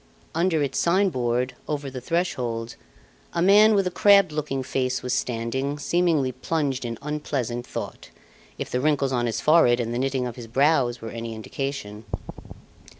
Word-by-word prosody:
Under 165 -2 +2
its 135 -1 -1
sign 190 +3 +3
board, 125 -2 -1
over 145 -2 -3
the 130 -1 -6
threshold, 120 -8 -2 0.6
a 170 - 0
man 210 +3 +6
with 195 -1 +2
a 180 - -1
crabbed 200 -2 +5
looking 150 -3 -2
face 130 0 -1
was 125 0 -1
standing, 130 +3 -2
seemingly 160 -4 +1
plunged 135 0 -2
in 115 -1 -4
unpleasant 135 -5 -3
thought, - - -6 0.5
if - - -5
the 125 - 0
wrinkles 140 -2 +1
on 120 -2 0
his 115 - -2
forehead 150 -6 +5
and 120 -1 -2
the 120 - -1
knitting 135 -1 0
of 120 -1 -6
his 120 -2 -8
brows 130 -1 +2
were 115 - -5
any 115 -1 -5
indication. 110 -2 -5
135 Hz, 165 wpm, -24 LUFS, 120-155 Hz, 0.6 s, man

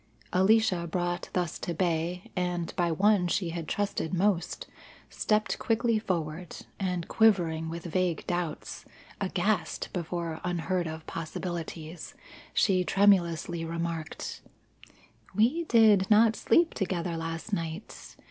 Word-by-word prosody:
Alicia 190 -2 +3
brought 175 +1 -2
thus 175 -3 -1
to 170 - -3
bay, 175 +1 -1
and 180 -2 -2
by 175 -1 +1
one 195 +2 +3
she 175 0 0
had 165 -1 -5
trusted 200 -4 -1
most, 180 -2 0 0.5
stepped 215 0 0
quickly 225 0 +1
forward, 170 -4 -3 0.2
and 180 -3 -2
quivering 170 -7 +3
with 170 +1 -6
vague 175 -1 0
doubts, 175 -3 -3 0.4
aghast - - -1
before 170 -2 -3
unheard 180 0 -1
of 160 0 -7
possibilities, 165 0 -6 0.4
she 185 -3 +3
tremulously 175 -4 +3
remarked: 165 -1 -4 0.9
"We 255 - +3
did 215 -7 +5
not 220 +1 +6
sleep 335 +8 +3
together 175 -3 -2
last 165 +5 -5
night. 165 +2 -5
175 Hz, 115 wpm, -29 LUFS, 165-200 Hz, 0.9 s, not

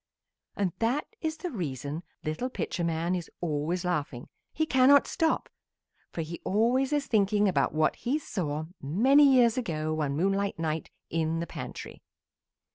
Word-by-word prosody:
And 190 -4 0
that 245 +6 +1 0.2
is 315 -1 -2
the 360 - -5
reason 150 - -4 0.2
little 155 +12 -2
Pitcher 180 - -3
man 165 +1 0
is 175 -2 -3
always 165 +2 -1
laughing. 150 -8 -2 0.2
He 315 - 0
cannot 275 0 +5
stop, 325 -3 0 0.6
for 165 - -4
he 165 +2 -7
always 245 +7 +2
is 290 -1 +1
thinking 210 -2 +2
about 185 - +2
what 155 0 +1
he 260 +5 0
saw 155 - -3 0.2
many 265 - +5
years 240 -1 +4
ago 155 -8 -2
one 145 -3 -1
moonlight 195 +3 0
night 160 -1 -2 0.2
in 165 0 0
the 170 - -2
pantry. - - -8
185 Hz, 150 wpm, -28 LUFS, 155-250 Hz, 0.6 s, cannot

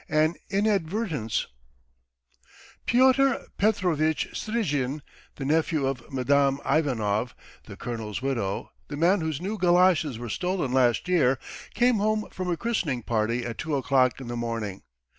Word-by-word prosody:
AN 155 +1 +3 0.2
INADVERTENCE 195 - 0 1.4
PYOTR 260 +2 +4
PETROVITCH 175 -7 +1
STRIZHIN, 150 - -2 0.3
the 135 - -5
nephew 155 0 +1
of 135 +2 -4
Madame 135 +1 +2
Ivanov, 125 -7 0 0.3
the - - -10
colonel's 110 -3 -4
widow 120 -7 -2 0.2
the 145 - -6
man 175 +5 +3
whose 160 -3 -2
new 200 +4 -4
goloshes 175 -7 +3
were 120 +1 -6
stolen 180 - -1
last 125 +3 +2
year, 140 -8 +3 0.4
came 245 -1 +3
home 215 +1 0
from 185 -1 -4
a 170 - 0
christening 165 - -1
party 115 +2 0
at 115 -2 -6
two 155 -2 -1
o'clock 130 -2 +2
in 130 - -8
the 120 - -4
morning. 115 -5 -3
150 Hz, 135 wpm, -26 LUFS, 125-185 Hz, 1.4 s, PYOTR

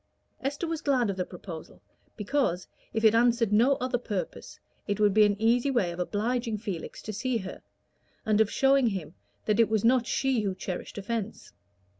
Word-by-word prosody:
Esther 285 +5 -2
was 325 -1 -3
glad 255 -8 +2
of - - -5
the 185 - -1
proposal, 175 -3 -9 0.4
because, 210 -5 0 0.2
if 220 0 -2
it 220 -1 +6
answered 230 -2 +3
no 245 +6 +5
other 255 -1 -1
purpose, 205 -6 -5 0.3
it 205 -1 -1
would 205 -2 +4
be 215 +1 +6
an 205 0 0
easy 235 +4 +3
way 240 -10 +1
of 170 - -8
obliging 225 +4 -1
Felix 195 -6 -6
to 215 - -5
see 240 +4 -1
her, 190 -3 -7 0.6
and 215 0 +3
of 215 - +3
showing 270 0 +3
him 190 -8 -3 0.3
that 215 +1 +1
it 230 - +5
was 220 -1 +1
not 245 0 +4
she 265 -4 +1
who 195 -3 -2
cherished 185 +1 -6
offence. 210 +1 -4
220 Hz, 185 wpm, -28 LUFS, 200-245 Hz, 0.6 s, it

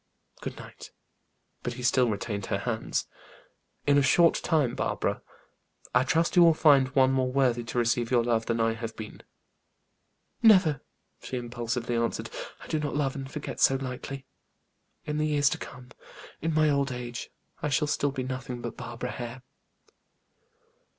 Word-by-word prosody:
Good - - -6
night." - - -11 0.7
But 120 - -3
he 125 0 -8
still 125 0 +3
retained 100 -1 -3
her 100 - 0
hands. 110 +2 -2 0.8
"In 145 0 +5
a - - +4
short 165 +5 +5
time, 150 -8 +1
Barbara, - - -1 0.7
I - - +5
trust 165 +5 +1
you 175 - +7
will 165 -2 +7
find 140 -5 +5
one 130 -1 +5
more 130 -1 +1
worthy 125 -3 +2
to 115 - -5
receive 120 0 +1
your 120 -2 +3
love 115 -1 0
than 115 0 0
I 115 0 +2
have 115 -1 -6
been." 110 -1 -8 1.2
"Never!" 185 - +5 0.4
she 130 - -4
impulsively 120 0 -3
answered. 115 0 -1 0.3
"I - - -10
do 155 - -1
not 150 -1 -3
love 140 -2 0
and 135 -1 -6
forget 150 - -6
so 135 - +5
lightly. 135 +1 -5 0.8
In 150 0 -2
the 155 - +1
years 145 -2 +3
to - - -3
come, 125 0 -10 0.5
in 165 - 0
my 155 0 +3
old 140 -1 +1
age, 120 -1 -6 0.3
I 150 - -1
shall 150 +2 +2
still 145 -1 0
be 135 -2 -3
nothing 130 -1 -5
but 120 -1 -6
Barbara 125 0 -5
Hare." 125 +1 -7
130 Hz, 165 wpm, -28 LUFS, 120-145 Hz, 1.2 s, you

